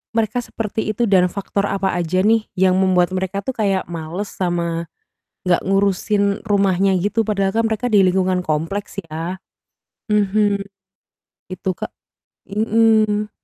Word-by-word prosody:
mereka 225 +1 0
seperti 220 0 -3
itu 235 +3 0
dan 185 -2 +5
faktor 200 0 -2
apa 195 0 0
aja 175 +2 0
nih 220 0 +3
yang 185 0 +3
membuat 185 -2 +3
mereka 190 +1 -2
tuh 265 - -2
kayak 195 -5 0
males, 170 +4 -5
sama 170 -2 -2 0.6
gak 175 - +4
ngurusin 200 +1 +1
rumahnya 195 -2 +2
gitu, 205 +4 +1
padahal 195 -2 0
kan 230 - +2
mereka 220 +3 -1
di 200 -2 +6
lingkungan 185 0 +1
kompleks 165 +7 -2
ya. 165 +4 -4 0.7
Mhm. 205 0 +2 0.9
Itu, 185 +1 -2
Kak. - - -5 0.6
Mhm. 215 0 +2
195 Hz, 135 wpm, -20 LUFS, 185-210 Hz, 0.9 s, di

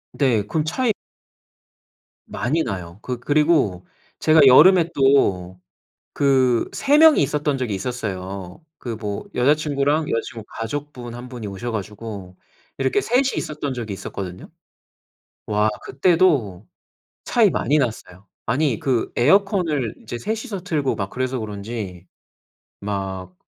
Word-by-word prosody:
네 120 -7 +2
그럼 155 +6 0
차이 220 +8 0 1.3
많이 155 +7 -1
나요. 90 -4 -6
그 125 -2 -4
그리고 145 - +2 0.3
제가 155 -1 +5
여름에 170 +6 +7
또 95 -10 +2 0.5
그 130 -4 +2
3 285 +2 +2
명이 315 -1 +7
있었던 150 -2 0
적이 115 -6 -2
있었어요. 95 - -5 0.2
그 120 -3 -5
뭐 105 - -5
여자친구랑 145 +2 +1
여자친구 115 -1 -3
가족분 125 0 -5
1 125 +1 -9
분이 120 -4 -7
오셔 100 +5 -5
가지고 105 -3 -6 0.4
이렇게 135 +9 +1
3 245 +2 +2
이 - - -4
있었던 150 -3 -3
적이 115 -5 -5
있었거든요. 95 -1 -7 1.0
와 105 0 +2 0.2
그때도 135 - +2 0.6
차이 - - +4
많이 145 +5 +1
났어요. 110 -7 -3 0.2
아니 135 -5 0
그 125 -4 0
에어컨을 160 - +2
이제 115 +2 -6
3 215 - -2
이서 200 -7 -5
틀고 150 -6 -1
막 100 -1 -3
그래서 130 0 -2
그런지 100 -3 -6 0.8
막 95 -2 -4
125 Hz, 250 characters per minute, -22 LUFS, 100-150 Hz, 1.3 s, 여름에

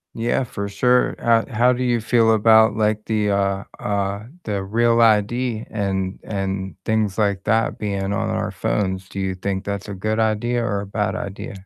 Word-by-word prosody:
Yeah, 120 +3 0
for 100 -4 -5
sure, 125 +5 +2
uh, 115 -1 +2
how 120 +3 +3
do 125 - -4
you 120 -2 +1
feel 115 0 +3
about, 110 0 +5
like, 105 0 0
the, 105 -2 0
uh 100 0 0 0.2
uh 100 0 -2 0.2
the 100 -2 -2
REAL 115 +3 +2
ID 115 +1 +2
and 95 -2 -2
and 95 -1 -3
things 110 -2 0
like 100 -2 0
that 115 0 +1
being 100 -1 -2
on - - -1
our - - -2
phones, 95 -2 -2
do 100 - -6
you 95 -1 -1
think 95 +1 -3
that's 100 0 -4
a 100 - -5
good 110 +3 -1
idea 115 +2 +1
or 100 -4 -1
a - - -6
bad 105 +1 -2
idea? 100 0 -7
105 Hz, 185 wpm, -21 LUFS, 100-115 Hz, 0.2 s, about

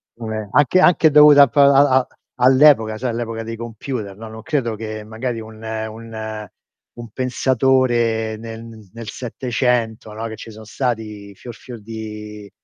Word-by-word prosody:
come 110 -3 -6
anche 145 +5 +3
anche 170 -3 +5
dovuta 145 -1 +8
p - - -12
a 140 -1 +5
a 130 - 0 0.3
all'epoca 130 -3 +4
sai 125 +2 -3
all'epoca 115 -1 -4
dei 115 +1 -6
computer, 115 -2 -6
no, 115 - -9
non 110 0 -10
credo 135 -8 -1
che 110 0 -6
magari 115 +2 -5
un 110 0 -11
un 110 -1 -6 0.5
un 120 -1 -9
pensatore 120 -3 +1
nel 115 0 -9 0.3
nel 115 -2 -8
700, 120 -2 -2
no, 110 +2 -5
che 110 - -7
ci 115 - -10
sono 110 0 -12
stati 110 -4 -4
fior 120 +3 -10
fior 120 -3 -11
di 105 -1 -8
115 Hz, 150 wpm, -19 LUFS, 110-130 Hz, 0.5 s, dovuta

